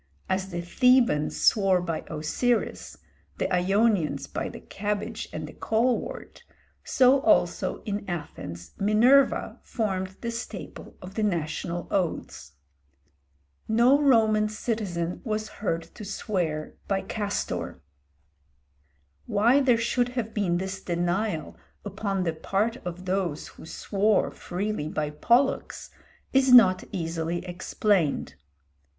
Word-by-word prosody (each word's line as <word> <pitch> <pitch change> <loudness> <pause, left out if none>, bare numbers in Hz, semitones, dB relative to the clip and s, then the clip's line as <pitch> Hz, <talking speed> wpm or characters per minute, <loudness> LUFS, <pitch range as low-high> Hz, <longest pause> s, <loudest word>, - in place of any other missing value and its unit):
As 190 0 -1
the 175 -2 -4
Thebans 240 - +3
swore 195 -3 +4
by 170 -2 -3
Osiris, 220 +10 -1 0.4
the - - 0
Ionians 195 -1 +2
by - - -4
the - - -9
cabbage 205 0 -4
and - - -5
the - - -10
colewort, 235 +2 -1 0.4
so 265 +1 +4
also - - +2
in 205 -2 -4
Athens 85 - -6
Minerva 240 +7 +4
formed 190 -4 -3
the 235 - -3
staple 225 -7 -7
of 185 +1 -9
the 220 - -2
national 175 -2 -2
oaths. 170 - -2 1.1
No 240 +6 +4
Roman 220 -6 +4
citizen 200 -6 -3
was 215 -2 -2
heard 165 -5 -1
to 215 - -9
swear 180 -6 -2
by 195 -1 0
Castor. 205 -2 -3 1.5
Why 235 +7 +4
there 255 -4 +4
should 240 +1 +1
have 225 -2 -2
been 185 -5 +1
this 190 +1 -4
denial 175 0 -2 0.3
upon 200 -1 -2
the 165 -2 -1
part 200 +8 -1
of 180 -5 -7
those 180 -5 -2
who - - -13
swore 205 +4 +1
freely 190 -3 -3
by 150 -1 -2
Pollux 240 - +1 0.4
is 265 -1 +4
not 225 -7 +7
easily 165 0 -3
explained. 180 - 0
195 Hz, 115 wpm, -26 LUFS, 175-225 Hz, 1.5 s, not